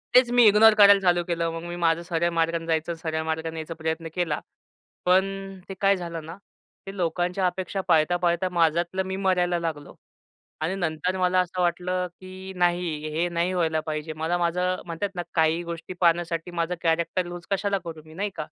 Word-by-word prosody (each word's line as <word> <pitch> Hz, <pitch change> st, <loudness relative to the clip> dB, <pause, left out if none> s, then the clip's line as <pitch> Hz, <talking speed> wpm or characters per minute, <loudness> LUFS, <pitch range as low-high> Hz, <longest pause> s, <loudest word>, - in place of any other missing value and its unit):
तेच 250 Hz, -1 st, +7 dB
मी 245 Hz, -, +8 dB
इग्नोर 215 Hz, +2 st, +7 dB
करायला 200 Hz, -1 st, +8 dB
चालू 175 Hz, -2 st, +3 dB
केलं. 170 Hz, -1 st, -1 dB
मग 165 Hz, -, -6 dB
मी 175 Hz, 0 st, -5 dB
माझं 165 Hz, 0 st, +2 dB
सरळ 170 Hz, 0 st, 0 dB
मार्गाने 165 Hz, 0 st, +1 dB
जायचं 160 Hz, +1 st, 0 dB
सरळ 160 Hz, -1 st, -2 dB
मार्गाने 160 Hz, 0 st, -3 dB
यायचा 160 Hz, +1 st, -5 dB
प्रयत्न 160 Hz, +1 st, -2 dB
केला. 175 Hz, -4 st, 0 dB, 0.7 s
पण 195 Hz, +1 st, +1 dB
ते -, -, -4 dB
काय 200 Hz, 0 st, +4 dB
झालं 170 Hz, -3 st, -6 dB
ना 165 Hz, +2 st, -8 dB, 0.5 s
ते 195 Hz, -, -6 dB
लोकांच्या 180 Hz, +2 st, 0 dB
अपेक्षा 185 Hz, +1 st, -3 dB
पाळता-पाळता 175 Hz, +3 st, +2 dB
माझ्यातलं 170 Hz, +3 st, +2 dB
मी 190 Hz, 0 st, -3 dB
मरायला 180 Hz, -2 st, +2 dB
लागलो. 160 Hz, -4 st, -5 dB, 0.7 s
आणि 165 Hz, +5 st, -1 dB
नंतर 180 Hz, 0 st, -1 dB
मला 185 Hz, 0 st, +2 dB
असं 180 Hz, 0 st, -1 dB
वाटलं 180 Hz, +1 st, 0 dB
की 185 Hz, 0 st, -9 dB
नाही 175 Hz, -4 st, 0 dB
हे 170 Hz, +2 st, +1 dB
नाही 170 Hz, +2 st, 0 dB
व्हायला 165 Hz, -3 st, +1 dB
पाहिजे. 155 Hz, 0 st, -4 dB
मला 160 Hz, +3 st, -1 dB
माझं 180 Hz, +1 st, 0 dB
म्हणतात 170 Hz, +4 st, -3 dB
ना 175 Hz, -, -2 dB
काही 160 Hz, +1 st, +2 dB
गोष्टी 170 Hz, +2 st, -7 dB
पाहण्यासाठी 170 Hz, 0 st, +1 dB
माझं 170 Hz, +2 st, 0 dB
कॅरेक्टर 170 Hz, +2 st, +1 dB
लूज 175 Hz, -1 st, -8 dB
कशाला 200 Hz, 0 st, +1 dB
करू 160 Hz, -2 st, -7 dB
मी 155 Hz, -, -14 dB
नाही 200 Hz, +5 st, -2 dB
का. 155 Hz, -, -4 dB
175 Hz, 180 wpm, -25 LUFS, 165-185 Hz, 0.7 s, मी